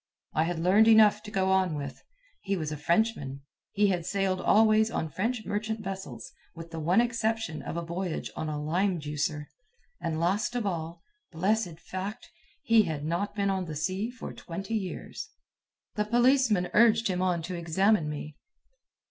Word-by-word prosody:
I 155 - +2
had 175 0 -2
learned 190 +6 +4
enough 215 -2 +6
to 215 - -9
go 190 -2 +1
on 185 -4 +2
with. 140 -2 -6 0.4
He 195 -1 -1
was 155 -3 -3
a - - -2
Frenchman. 150 -4 0 0.3
He 205 -1 +3
had 180 -3 0
sailed 190 0 0
always 215 +1 +4
on 160 -7 -3
French 220 - -2
merchant 220 +1 -3
vessels, 190 0 -6 0.2
with 165 0 -9
the 165 - -5
one 170 +7 +3
exception 225 -8 0
of 165 - -5
a 170 - -2
voyage 170 0 -3
on 160 - -3
a 150 -1 -3
"lime 175 +5 0
juicer." 150 0 -2 0.6
And 160 -1 -2
last 200 +8 0
of 240 -3 -1
all 165 -3 -4 0.3
blessed 180 0 0
fact! 195 +6 -6 0.3
he 230 -5 +5
had 155 -6 -3
not 195 +6 -2
been 200 -1 +1
on 190 -1 -1
the 155 -2 -6
sea 185 +8 -1
for 245 -1 -8
twenty 195 +6 -6
years. 195 -5 -4 0.6
The 210 - -1
policeman 240 -5 +3
urged 225 0 +5
him 185 -2 -1
on 180 -3 0
to 180 +3 -5
examine 170 +1 +2
me. 150 0 -6
190 Hz, 175 wpm, -28 LUFS, 165-215 Hz, 0.6 s, enough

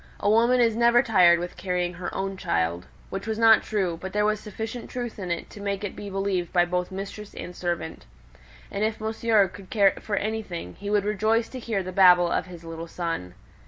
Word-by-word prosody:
A - - -1
woman 235 +4 +4
is 230 -2 +3
never 235 +2 +5
tired 180 -7 +5
with 175 +1 -5
carrying 180 -1 -2
her 180 +1 -5
own 195 0 -3
child" 85 - -1 0.2
(which 195 +2 -5
was 220 -1 -2
not 225 -1 +6
true; 185 -6 -2
but 190 0 -6
there 210 0 +2
was 215 0 +1
sufficient 220 +3 -6
truth 240 -3 -5
in 185 -2 -5
it 170 - -3
to 205 - -10
make 200 0 -2
it 205 - -4
believed 195 -3 -2
by 175 -1 +4
both 180 0 -2
mistress 200 +2 -7
and 180 - -7
servant), 170 - -4 0.6
"and 200 - -2
if 220 0 -1
Monsieur 220 -2 +2
could 185 +1 -13
care 200 -3 +4
for 210 - -3
anything, 200 - -3
he 205 - -5
would 205 -1 +2
rejoice 215 +2 +1
to 260 - -7
hear 220 -5 -2
the 185 - -5
babble 180 -2 +6
of - - 0
his 175 -2 -11
little 165 0 -7
son." 165 - -4
195 Hz, 210 wpm, -25 LUFS, 180-215 Hz, 0.6 s, not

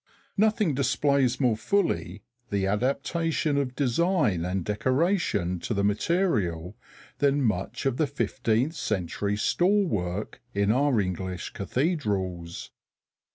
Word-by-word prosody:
Nothing 215 -5 +2
displays 135 -1 +2
more 125 -5 +3
fully 105 - -1 0.3
the 100 -1 0
adaptation 145 - 0
of 130 -3 -1
design 140 - +1
and 90 0 -2
decoration 130 - 0
to 110 - -3
the 100 - +1
material 105 - 0 0.4
than 140 0 +2
much 110 +2 -1
of 135 -2 +1
the 155 - +2
fifteenth 130 0 0
century 100 - -2
stall 195 - +2
work 100 - -3
in 100 +1 +2
our 135 0 +3
English 95 -1 -3
cathedrals. 100 - -2
120 Hz, 110 wpm, -27 LUFS, 100-150 Hz, 0.4 s, more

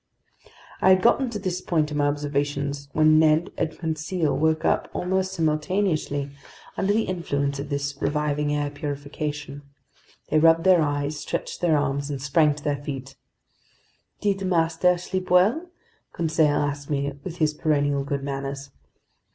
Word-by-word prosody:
I - - +5
had 185 0 +5
gotten 250 +2 +3
to 225 - -4
this 185 -2 -3
point 155 -4 0
in 150 - -2
my 145 0 +2
observations 145 -1 -2
when 155 +1 +5
Ned 155 +1 +3
and - - 0
Conseil 160 0 -1
woke 160 +1 +1
up - - +1
almost 190 +1 -1
simultaneously, 155 -3 0 0.4
under 195 - +1
the 220 +2 +2
influence 140 -6 -2
of 140 +1 -5
this 140 0 -2
reviving 150 0 0
air 145 -1 -1
purification. 145 0 -5 0.7
They 155 - +3
rubbed 165 +1 +5
their 185 -2 +5
eyes, 145 0 -1
stretched - - -4
their 165 -3 +3
arms, 140 0 -1
and 140 -2 -3
sprang 145 +2 +2
to 145 - -11
their 145 -1 -2
feet. 135 -1 -6 1.1
"Did 195 -1 0
master 175 0 +2
sleep 185 +1 -4
well?" 215 - +3 0.4
Conseil 160 -2 +2
asked 145 -1 -2
me 140 -1 -1
with 175 -2 -6
his 155 -2 +2
perennial 145 -2 +1
good 140 0 -3
manners. 140 0 -5
150 Hz, 150 wpm, -24 LUFS, 145-170 Hz, 1.1 s, I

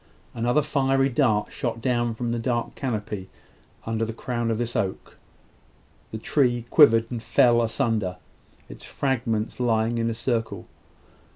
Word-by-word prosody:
Another 120 +5 +1
fiery 135 -2 +1
dart 120 -6 +1
shot 115 -2 -3
down 120 -1 0
from 120 +1 -3
the 120 - -1
dark 120 0 -2
canopy, 105 -6 -4 0.5
upon 115 0 -3
the 115 0 -1
crown 120 0 -3
of 115 - 0
this 120 +1 -3
oak. 100 -5 -3 1.0
The 110 - -4
tree 120 0 +1
quivered 115 -7 +6
and 120 -2 -4
fell 120 +1 +4
asunder, 110 -6 -1 0.5
its - - -11
fragments 115 -5 -2
lying 115 -1 +1
in 115 0 0
a 115 - -3
circle. 115 -1 -2
115 Hz, 145 wpm, -25 LUFS, 115-125 Hz, 1.0 s, quivered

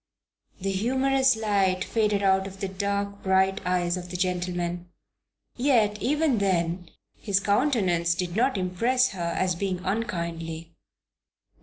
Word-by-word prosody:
The 195 +1 -2
humorous 260 +5 +2
light 200 -4 +1
faded 210 -3 0
out 190 0 +3
of 195 0 -11
the 195 - -2
dark, 200 +1 -3
bright 190 +1 +2
eyes 180 0 +1
of 180 0 -7
the 180 - -4
gentleman. 175 -1 -2 0.7
Yet 230 -6 +2
even 290 -1 +1
then 175 -2 0 0.3
his 200 -3 0
countenance 195 - +1
did 180 0 -3
not 250 +1 +2
impress 235 +8 +1
her 170 -3 -3
as 185 -1 +1
being 185 +1 -2
unkindly. 170 -6 -3
195 Hz, 130 wpm, -26 LUFS, 180-215 Hz, 0.7 s, out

